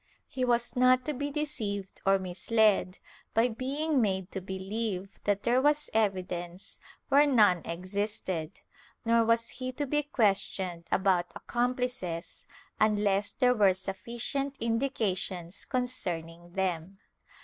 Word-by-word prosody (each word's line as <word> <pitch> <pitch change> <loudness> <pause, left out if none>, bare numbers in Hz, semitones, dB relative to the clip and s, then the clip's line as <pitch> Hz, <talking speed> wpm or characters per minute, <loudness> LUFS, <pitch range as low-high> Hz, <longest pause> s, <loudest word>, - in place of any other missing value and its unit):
He 255 - -3
was 240 -1 +1
not 255 0 +4
to 300 - -1
be 285 +2 -3
deceived 225 -10 -3
or 195 0 +6
misled 190 +1 +2 0.4
by 230 +2 +4
being 275 +5 0
made 190 -3 -1
to 190 - -4
believe 195 +1 -3
that 205 -1 +1
there 245 +2 +3
was 295 +1 +2
evidence 185 -4 -2 0.3
where 290 +1 +6
none 210 -10 +5
existed, 185 -1 -3 0.4
nor 230 0 +4
was 230 0 +2
he 255 -1 -5
to 290 +3 -2
be 295 +2 +1
questioned 195 - 0
about 185 -2 +2
accomplices, 245 -8 -2 0.3
unless 205 -2 +2
there 250 -1 +3
were 200 -5 +4
sufficient 235 +9 -3
indications 205 -7 -2
con 255 -2 0
cerning 175 -7 -5
them. 185 0 -2
210 Hz, 125 wpm, -29 LUFS, 185-250 Hz, 0.4 s, or